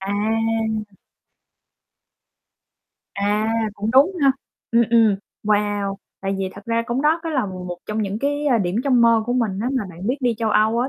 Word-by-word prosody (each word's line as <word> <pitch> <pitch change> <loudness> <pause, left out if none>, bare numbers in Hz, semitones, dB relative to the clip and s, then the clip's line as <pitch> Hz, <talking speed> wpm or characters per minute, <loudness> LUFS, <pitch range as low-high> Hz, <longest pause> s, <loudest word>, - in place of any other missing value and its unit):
À. 220 +2 0 2.3
À, 205 +2 0 0.3
cũng 210 +2 -2
đúng 275 +9 +5
ha, 275 -1 +5 0.4
ừm, 235 0 +5
ừm, 225 -4 +5 0.3
wow, 205 -1 0 0.3
tại 195 0 -2
vì 190 -1 -1
thật 200 - -11
ra 230 0 +1
cũng 250 +3 -1
đó 315 +3 +3
có 330 - -3
là 265 -8 0
một 180 -2 -6
trong 215 +1 -2
những 200 +1 -3
cái, 290 +3 -1
a, 250 -5 +3
điểm 180 -1 -1
trong 255 -3 +3
mơ 230 -1 +5
của 245 - 0
mình 225 -6 0
á, 245 - 0
mà 255 -6 0
bạn 180 +3 -8
biết 255 +4 +1
đi 245 -2 +1
châu 225 -1 0
Âu 220 +2 +3
á 255 +2 0
220 Hz, 185 wpm, -21 LUFS, 205-245 Hz, 2.3 s, đúng